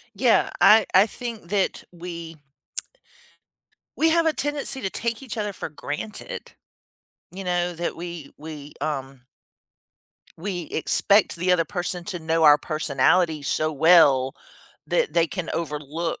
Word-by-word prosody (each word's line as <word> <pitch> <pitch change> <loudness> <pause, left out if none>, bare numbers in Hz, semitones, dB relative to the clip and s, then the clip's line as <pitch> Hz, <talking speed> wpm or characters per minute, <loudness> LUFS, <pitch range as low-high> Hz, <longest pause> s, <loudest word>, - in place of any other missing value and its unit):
Yeah, - - +3
I 215 0 +7
I 190 +3 +7
think 225 -5 -7
that 200 -2 0
we 170 -2 -8 1.6
we 320 +1 +3
have 335 0 +3
a 320 - +3
tendency 290 -3 -1
to 195 - -2
take 235 +4 -3
each 245 -4 -7
other 210 -1 -2
for - - -6
granted, 180 - -7 0.8
you 190 +1 -8
know, 175 -1 0
that 170 +1 -3
we 170 -3 -8
we, 150 -1 -9
um 135 -4 -4 1.1
we 180 0 -4
expect 200 +6 +3
the 180 +2 0
other 170 -2 +3
person 175 -1 -4
to 180 -1 -5
know 160 0 +1
our 150 -1 +8
personality 155 +1 +1
so 155 +2 0
well, 140 -4 +5 0.5
that - - 0
they 170 0 +3
can 180 0 -5
overlook, 155 +1 -3
170 Hz, 135 wpm, -24 LUFS, 155-200 Hz, 1.6 s, our